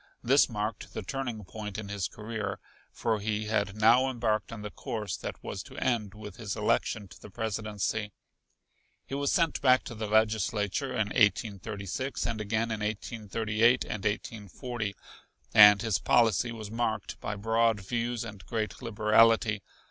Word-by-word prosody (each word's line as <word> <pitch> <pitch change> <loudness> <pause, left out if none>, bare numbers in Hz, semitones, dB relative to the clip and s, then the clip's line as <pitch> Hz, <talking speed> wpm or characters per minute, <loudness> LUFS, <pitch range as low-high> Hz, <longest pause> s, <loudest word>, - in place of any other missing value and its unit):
This 135 +4 +5
marked 105 -1 -4
the - - -3
turning 120 -1 -4
point 105 +1 -6
in 110 -2 -5
his 100 -3 -2
career, 105 -3 -5 0.3
for 110 -2 -1
he 105 +1 -2
had 100 -2 0
now 120 +4 +5
embarked 115 -5 -1
on 110 -2 -7
the 105 - -5
course 105 -2 -4
that - - -7
was - - -5
to - - -13
end 110 -5 -1
with 105 -3 -9
his 110 -4 -4
election 105 -2 0
to - - -15
the - - -10
Presidency. 105 0 -2 0.9
He - - -9
was 140 0 0
sent 165 -3 +1
back 130 -2 +5
to - - -7
the 110 -1 -4
Legislature 110 +2 +1
in 110 -4 0
1836 100 +2 0
and 115 -2 -2
again 110 +2 -1
in 110 - -2
1838 110 +2 +1
and 105 -3 -5
1840; 110 +1 -3 0.6
and 105 0 +9
his 110 -5 +1
policy 115 0 +3
was 110 -3 -7
marked 110 -3 -2
by 105 - -4
broad 115 +1 +2
views 120 +3 -2
and 105 -4 -9
great 110 -3 -3
liberality. 110 -1 +3
110 Hz, 155 wpm, -29 LUFS, 105-115 Hz, 0.9 s, and